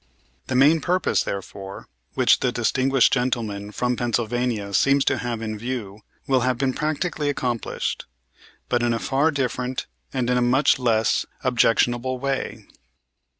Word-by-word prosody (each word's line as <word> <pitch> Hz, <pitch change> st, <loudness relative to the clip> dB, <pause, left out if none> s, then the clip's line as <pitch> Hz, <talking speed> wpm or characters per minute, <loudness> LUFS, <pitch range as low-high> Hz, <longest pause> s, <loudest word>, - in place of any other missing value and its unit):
The -, -, -2 dB
main 150 Hz, +5 st, +5 dB
purpose, 180 Hz, +3 st, +1 dB
therefore, 100 Hz, 0 st, -6 dB, 0.3 s
which -, -, +4 dB
the -, -, +1 dB
distinguished 135 Hz, -1 st, +2 dB
gentleman 115 Hz, -5 st, -1 dB
from 125 Hz, +4 st, -1 dB
Pennsylvania 120 Hz, -3 st, -1 dB
seems 140 Hz, +5 st, +3 dB
to -, -, +1 dB
have 120 Hz, -2 st, -3 dB
in 110 Hz, -1 st, -4 dB
view 110 Hz, -4 st, -5 dB, 0.3 s
will 135 Hz, -1 st, +3 dB
have 125 Hz, 0 st, 0 dB
been 130 Hz, 0 st, 0 dB
practically 155 Hz, 0 st, -1 dB
accomplished, 125 Hz, -4 st, -3 dB, 0.6 s
but 120 Hz, -1 st, +1 dB
in 120 Hz, -1 st, +1 dB
a -, -, 0 dB
far 135 Hz, +10 st, +1 dB
different 130 Hz, -3 st, -2 dB, 0.3 s
and 125 Hz, -2 st, -1 dB
in 125 Hz, 0 st, +2 dB
a -, -, 0 dB
much 130 Hz, +3 st, +3 dB
less 115 Hz, -3 st, +1 dB, 0.2 s
objectionable 120 Hz, +1 st, +2 dB
way. 135 Hz, +1 st, -3 dB
125 Hz, 145 wpm, -23 LUFS, 115-135 Hz, 0.6 s, main